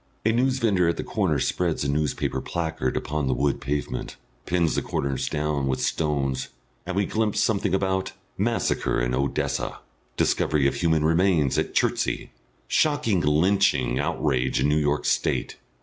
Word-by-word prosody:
A 110 - +4
newsvendor 115 -8 +2
at 85 - -1
the - - -3
corner - - 0
spreads 85 -5 0
a - - -1
newspaper 70 -2 -1
placard 80 -6 -2
upon 75 -1 -2
the 65 - +1
wood 70 +2 0
pavement, 70 +3 -3 0.3
pins 85 -3 +1
the - - 0
corners 70 -1 -2
down 75 -2 -1
with 65 - 0
stones, 70 -4 -1 0.4
and 90 - -3
we 100 0 +2
glimpse 110 0 0
something 100 -4 +1
about: 95 -1 -1 0.2
MASSACRE - - 0
IN - - 0
ODESSA. 70 +2 -1 0.4
DISCOVERY 75 -3 +2
OF 70 - +3
HUMAN 80 -2 +1
REMAINS 80 -3 +3
AT - - -3
CHERTSEY. - - 0 0.4
SHOCKING 115 - +2
LYNCHING 75 - +2
OUTRAGE 65 -5 0
IN 70 - +2
NEW 75 +1 +3
YORK 75 0 0
STATE. - - 0
75 Hz, 150 wpm, -25 LUFS, 70-95 Hz, 0.4 s, A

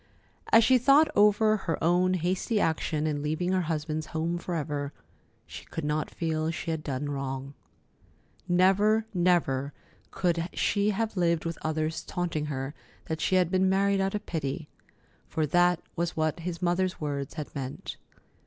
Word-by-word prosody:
As 225 - +7
she 255 +2 +5
thought 285 +5 +5
over 210 +1 +5
her 170 -5 -2
own 180 +2 +3
hasty 185 +5 0
action 155 -3 0
in 150 -2 -1
leaving 155 +5 -1
her 185 -1 +2
husband's 155 -1 -2
home 165 +2 -2
forever, 150 -5 -3 0.5
she - - -9
could 165 - -5
not 150 +1 -1
feel 160 -1 -1
she 165 0 -3
had 160 -1 -2
done 140 0 -3
wrong. 135 0 -4 0.9
Never, 195 +5 +4
never 170 -7 +1 0.4
could 170 -1 0
she 205 0 +1
have 215 +1 -1
lived 170 -3 +1
with 165 -1 -3
others 155 0 -1
taunting 170 -4 -2
her 135 -1 -4 0.3
that 160 0 -3
she 185 - +2
had 180 -2 +3
been 185 0 +3
married 195 +1 +2
out 195 +1 0
of 210 - -4
pity—for 155 0 -5
that 175 +3 +3 0.2
was 170 0 -2
what 155 +1 0
his 170 +1 -5
mother's 180 +1 +1
words 140 -2 -3
had 150 -2 -6
meant. 135 -2 -6
170 Hz, 155 wpm, -28 LUFS, 155-185 Hz, 0.9 s, As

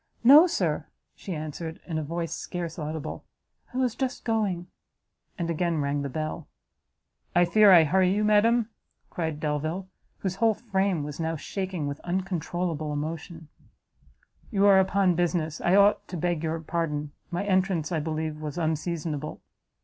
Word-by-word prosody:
"No, 290 +8 +9
Sir," - - -1 0.3
she 185 - -6
answered, 155 +2 -6
in 160 -3 -2
a - - -3
voice 165 +2 -3
scarce 170 -2 -5
audible, 155 0 -5 0.5
"I 250 - -6
was 255 -3 +1
just 260 0 -3
going." 205 -6 0 0.7
And 170 -3 -2
again 170 0 0
rang 140 0 0
the 140 - -3
bell. 155 +3 -4 0.9
"I 175 0 +6
fear 210 +3 +6
I 170 -3 +9
hurry 185 +4 +3
you, 210 +2 +1
madam?" 225 +2 +3 0.4
cried 160 -3 -3
Delvile, 155 +5 -2 0.3
whose 190 -1 -3
whole 225 -2 +3
frame 195 -7 0
was 145 +1 -6
now 165 0 -1
shaking 185 0 -4
with 145 0 -4
uncontrollable 175 -3 -2
emotion; 160 +2 -5 1.0
"you 200 -4 +2
are 195 -1 +7
upon 190 -1 +3
business 170 -2 -1
I 175 - +3
ought 200 +1 +4
to 180 - -5
beg 175 -1 -1
your 165 0 -2
pardon 150 -3 -2 0.2
my 175 +3 -2
entrance, 185 -4 +1
I 165 - +1
believe, 155 0 -3
was 150 +1 -5
unseasonable." 155 -2 -2
170 Hz, 155 wpm, -27 LUFS, 155-190 Hz, 1.0 s, No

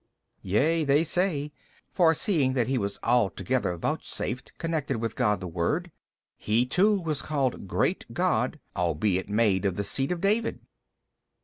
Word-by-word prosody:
B. - - -10
Yea, 160 +9 +3
they 145 +2 +3
say: 155 -3 0 0.4
for 165 -3 +4
seeing 150 -8 +1
that 125 -3 +1
He 130 +2 0
was 100 -1 -3
altogether 115 -4 +1
vouchsafed 125 +8 -4
connection 155 -7 -2
with 115 -1 -3
God 105 -6 +1
the 90 - -5
Word, 90 - -1 0.5
he 115 +4 +1
too 195 +10 +3
was 155 -6 -2
called 135 -9 -2
great - - 0
God - - 0 0.2
albeit 90 +3 0
made 105 -3 +2
of 95 -3 0
the 100 - -2
seed 135 - -1
of 175 - -1
David. 215 +5 0
130 Hz, 150 wpm, -27 LUFS, 100-160 Hz, 0.5 s, for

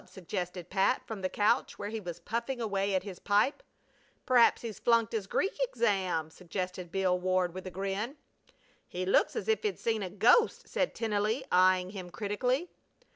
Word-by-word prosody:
suggested 180 -1 -5
Pat 195 +6 +2
from 220 -3 -6
the 185 - -1
couch 215 +6 +1
where 205 - -4
he 220 +1 -4
was 175 -5 -7
puffing 235 +3 -3
away 200 -3 0
at 185 - 0
his 190 -3 -8
pipe. 210 - +2 0.6
"P'raps 245 -2 +5
he's 225 -4 -6
flunked 230 -1 +2
his 210 -4 -2
Greek 390 - 0
exam.," 190 - 0
suggested 180 0 -5
Bill 185 -1 +1
Ward, 185 -1 +1
with 185 0 -7
a - - -3
grin. 195 - -3 0.7
"He 185 +1 -4
looks 190 - +3
as 200 - -3
if 220 -1 +2
he'd 205 -4 -1
seen 225 -2 -1
a 190 - -3
ghost!" 225 - +3
said - - -1
Tennelly, 220 +3 0
eying 185 0 +4
him 185 -3 -7
critically. 245 - -1
200 Hz, 175 wpm, -30 LUFS, 185-225 Hz, 0.7 s, P'raps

